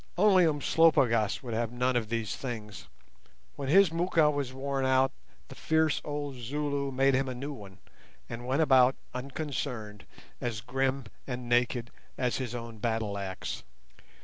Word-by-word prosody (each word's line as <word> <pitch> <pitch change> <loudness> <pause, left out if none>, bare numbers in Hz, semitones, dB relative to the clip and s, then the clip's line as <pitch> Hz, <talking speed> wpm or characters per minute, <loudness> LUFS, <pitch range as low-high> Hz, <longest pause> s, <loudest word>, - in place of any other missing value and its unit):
Only 190 -2 +6
Umslopogaas 140 -8 +3
would 120 -3 -5
have 115 0 -1
none 125 +1 0
of 115 -3 0
these 115 -3 -2
things; 105 - -6 0.7
when 140 -2 -4
his 195 +2 +6
moocha 165 -2 +3
was 140 -3 -2
worn 135 +1 -2
out 130 0 +3 0.4
the - - -10
fierce 160 -2 +1
old 145 -1 -4
Zulu 140 +3 -2
made 135 +1 +3
him 135 0 +1
a 130 - -4
new 140 +4 -5
one, 100 -7 -11 0.5
and 120 +1 -7
went 135 +5 +2
about 130 -3 +5 0.2
unconcerned, 125 -6 -5 0.3
as 115 -3 -3
grim 135 +3 -1 0.2
and 125 -2 -5
naked 120 0 +1 0.3
as 125 -1 0
his 125 -3 -4
own 115 -2 -7
battleaxe. 105 -4 -3
130 Hz, 150 wpm, -29 LUFS, 115-140 Hz, 0.7 s, Only